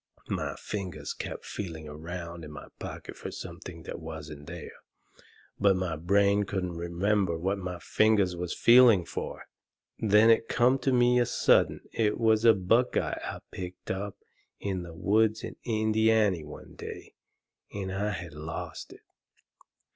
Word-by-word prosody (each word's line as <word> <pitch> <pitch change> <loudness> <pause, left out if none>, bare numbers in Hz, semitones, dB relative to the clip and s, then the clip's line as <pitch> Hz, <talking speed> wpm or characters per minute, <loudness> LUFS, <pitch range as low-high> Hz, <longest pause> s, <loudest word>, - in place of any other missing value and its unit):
My - - -2
fingers 95 -4 -5
kept - - -6
feeling 80 -6 -6
around 85 +2 -7
in 75 - -8
my 75 - -10
pocket - - -7
fur - - -6
something 80 0 -8
that - - -6
wasn't 75 -2 -8
there. - - -7 0.9
But 100 -1 +4
my 90 -3 -1
brain 100 +5 +3
couldn't 90 -3 -3
remember 85 +1 0
what 95 +4 -1
my 90 -1 -4
fingers 100 -1 +2
was 90 0 -4
feeling 115 -7 +7
fur. - - -5 0.6
Then 110 +1 +6
it 115 0 +3
come 125 +2 +3
on 130 -2 +4
me 120 0 +5
sudden - - +3
it 105 -2 +1
was 110 -1 +3
a 115 -2 +8
buckeye 115 +7 +1
I - - -5
picked 90 -1 -6
up 100 +1 -4 0.4
in 95 -2 -2
the 85 -1 -9
woods 110 +4 +2
in - - -6
Indiany 110 -5 +2
one 75 - -11
day, - - -9 0.6
and 95 -2 -4
I 100 +2 -1
had 85 -5 -5
lost 75 +2 -6
it. - - -17
95 Hz, 145 wpm, -29 LUFS, 85-110 Hz, 0.9 s, a